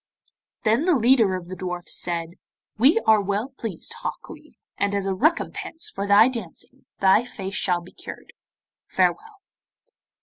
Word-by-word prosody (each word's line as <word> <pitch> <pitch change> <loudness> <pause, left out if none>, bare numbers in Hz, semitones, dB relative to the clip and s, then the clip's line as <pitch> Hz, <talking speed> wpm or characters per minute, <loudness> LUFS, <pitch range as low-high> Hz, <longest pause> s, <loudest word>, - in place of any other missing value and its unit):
Then 225 +8 +2
the 360 -3 +4
leader 230 -5 +4
of 180 -2 -6
the 185 - -6
dwarfs 180 -1 -3
said, 170 -1 -2 0.5
'We 290 - +5
are 220 -1 +4
well 205 +5 -2
pleased, 225 -9 -5
Hok - - -6
Lee, - - -14 0.2
and 200 0 0
as 200 -1 -1
a 195 - 0
recompense 320 - -1
for 200 +1 -4
thy 205 +3 +7
dancing 230 -10 -7
thy 195 +4 +5
face 195 -5 -7
shall 180 -3 0
be 175 - -14
cured. - - -10 0.5
Farewell. 425 -1 0
205 Hz, 155 wpm, -24 LUFS, 185-255 Hz, 0.5 s, thy